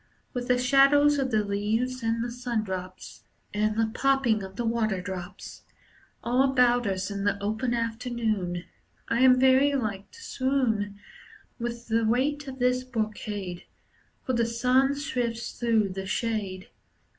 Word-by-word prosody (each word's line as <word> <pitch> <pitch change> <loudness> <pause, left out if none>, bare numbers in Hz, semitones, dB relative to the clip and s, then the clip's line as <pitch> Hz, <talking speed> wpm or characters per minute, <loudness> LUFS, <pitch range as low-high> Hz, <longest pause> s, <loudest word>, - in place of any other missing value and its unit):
With 245 -1 -3
the 250 -1 +3
shadows 280 +3 +5
of 265 -1 0
the 215 -3 +2
leaves 220 +6 -1
and 230 0 0
the 240 - -4
sundrops, 215 -7 -5 0.3
And 210 +1 +1
the 225 0 +2
plopping 270 -5 +2
of 190 0 -8
the 240 - -2
waterdrops, 195 -5 -3 0.6
All 250 +2 +2
about 250 -3 +3
us 190 0 -2
in 200 0 -3
the 205 0 +1
open 220 +4 -1
afternoon 225 -6 -2 0.5
I 235 - +1
am 255 0 +6
very 265 +2 +5
like 205 -6 -3
to 460 - -14
swoon 235 - -1 0.6
With 235 0 -4
the 225 0 +1
weight 275 +6 0
of 265 -1 -7
this 250 0 +1
brocade, 210 -6 -4 0.6
For 260 - -1
the 235 -1 +2
sun 255 +4 +2
sifts 240 -5 -3
through 225 -4 +2
the 190 +1 -5
shade. 200 -4 -2
230 Hz, 145 wpm, -27 LUFS, 205-255 Hz, 0.6 s, am